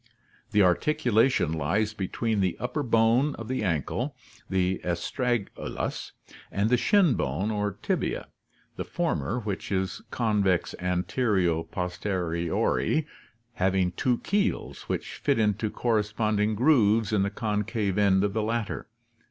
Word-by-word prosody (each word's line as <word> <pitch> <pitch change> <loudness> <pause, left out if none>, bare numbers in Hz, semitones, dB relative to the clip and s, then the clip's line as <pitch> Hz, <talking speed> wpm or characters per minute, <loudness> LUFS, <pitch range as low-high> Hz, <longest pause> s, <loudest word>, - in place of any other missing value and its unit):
The 105 -1 +3
articula 120 - +3
tion 80 - 0
lies 95 +8 0
between 110 +2 -1
the 95 -2 0
upper 125 +4 -2
bone 120 +3 +3
of 115 - -8
the 130 +1 -2
ankle, 105 - -1 0.3
the 95 -1 0
astragalus, 100 +6 -2 0.4
and 105 +4 0
the - - +6
shin 190 - +4
bone 95 - -1
or 105 -1 -1
tibia, - - -1 0.5
the - - -2
former, 85 - -1
which 100 -3 -4
is 95 -1 -1
convex 105 -6 +1
antero 90 -1 +1
pos 90 +1 -4
teriorly, 90 - 0 0.5
having 95 -2 +1
two 120 +7 +1
keels 205 +3 -1
which - - -3
fit 140 -2 +1
into 105 0 +1
corresponding 105 -1 0
grooves 110 -5 +3
in 105 - +3
the 100 - +1
concave 105 -1 -1
end 95 -2 +4
of 100 -1 0
the 110 - 0
latter. 110 0 -2
105 Hz, 130 wpm, -27 LUFS, 95-115 Hz, 0.5 s, the